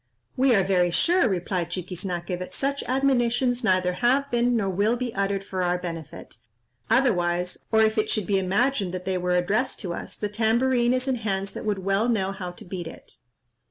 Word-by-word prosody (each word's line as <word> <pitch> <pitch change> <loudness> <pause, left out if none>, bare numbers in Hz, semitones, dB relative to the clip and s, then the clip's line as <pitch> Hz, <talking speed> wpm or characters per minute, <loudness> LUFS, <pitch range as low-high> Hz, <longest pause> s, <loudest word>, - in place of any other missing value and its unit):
"We 260 -2 +4
are 195 - +4
very 180 -2 +2
sure," 345 - +3
replied 180 -2 -2
Chiquiznaque, 180 0 -4
"that 185 0 -7
such 280 +1 -1
admonitions 250 -1 +1
neither 185 -3 +2
have 260 +8 +1
been 240 0 +2
nor 205 -3 0
will 205 +6 +1
be 245 -2 -3
uttered 195 0 -1
for 190 -1 -4
our 180 0 +1
benefit; 165 -4 -8 0.5
otherwise, 180 -8 +1
or 220 -1 +5
if 220 0 +2
it 215 - 0
should 215 - 0
be 195 0 +1
imagined 195 0 0
that 185 0 -6
they 185 -1 -1
were 180 0 0
addressed 200 +9 0
to 180 -5 -3
us, - - -7
the 210 - -3
tambourine 240 +3 +2
is 255 +1 -1
in 260 -2 +1
hands 195 -3 -2
that - - -7
would 200 -3 -2
well 195 +4 +2
know 195 -5 +1
how 190 -2 -6
to 175 - -10
beat 175 -2 -5
it." - - -12
200 Hz, 195 wpm, -25 LUFS, 180-240 Hz, 0.5 s, or